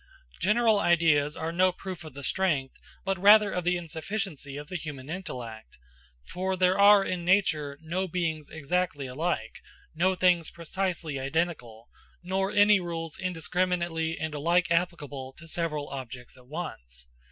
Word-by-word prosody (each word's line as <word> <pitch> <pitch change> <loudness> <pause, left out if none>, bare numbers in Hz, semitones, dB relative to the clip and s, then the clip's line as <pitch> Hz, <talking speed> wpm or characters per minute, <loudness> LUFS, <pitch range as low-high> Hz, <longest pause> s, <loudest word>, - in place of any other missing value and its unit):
General 215 +2 +3
ideas 155 -5 +3
are 160 +1 -3
no 185 +2 +3
proof 185 -1 -8
of 155 -4 -11
the 140 - -8
strength, 150 -5 0 0.3
but 195 -1 -1
rather 205 0 +7
of 180 - -2
the 180 +1 +2
insufficiency 165 -3 -4
of 145 0 -7
the 185 - -7
human 150 -4 -6
intellect; 120 - -7 0.5
for 190 +1 -2
there 185 +1 +3
are 200 0 +7
in 180 -1 -2
nature 160 -6 +2
no 180 +4 -2
beings 160 -4 -2
exactly 160 -1 -2
alike, 155 +7 -3 0.3
no 185 +4 +2
things 180 -3 +3
precisely 170 -3 -3
identical, 135 -6 -2 0.4
nor 190 +2 0
any 205 0 +5
rules 165 -2 -5
indiscriminately 175 -2 -1
and 160 -1 -3
alike 170 +3 +1
applicable 145 -6 -1
to 165 - -13
several 160 -3 -2
objects 130 -2 -8
at 125 -1 -18
once. 65 - -7
170 Hz, 145 wpm, -28 LUFS, 145-185 Hz, 0.5 s, rather